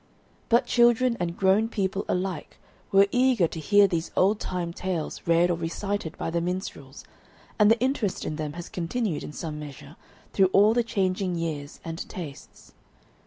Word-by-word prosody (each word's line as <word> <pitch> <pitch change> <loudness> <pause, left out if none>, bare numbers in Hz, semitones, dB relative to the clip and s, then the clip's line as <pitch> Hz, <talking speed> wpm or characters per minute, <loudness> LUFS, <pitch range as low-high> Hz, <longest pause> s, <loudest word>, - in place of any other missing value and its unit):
But 235 +2 +4
children 240 0 +3
and 175 -1 -3
grown 200 +4 +3
people 195 -2 -2
alike 180 -1 -3 0.3
were 195 0 +6
eager 250 -8 +3
to 160 - -7
hear 205 +5 +5
these 170 -3 -2
old 205 +3 +3
time 175 -2 -3
tales 180 -3 -4
read 170 +1 +4
or 170 - -1
recited 170 +1 -3
by - - -3
the 170 0 0
minstrels, 180 +3 -5 0.5
and 210 0 +6
the 225 +1 +4
interest 250 -6 -1
in 155 - -3
them 150 -1 -4
has 170 +1 -7
continued 180 0 -2
in - - -7
some 150 0 -6
measure 145 0 -10 0.4
through 190 -2 +4
all 210 +3 +6
the 240 - +3
changing 190 -4 -1
years 155 -4 -4
and 165 0 -6
tastes. 155 -7 -10
185 Hz, 165 wpm, -26 LUFS, 165-210 Hz, 0.5 s, were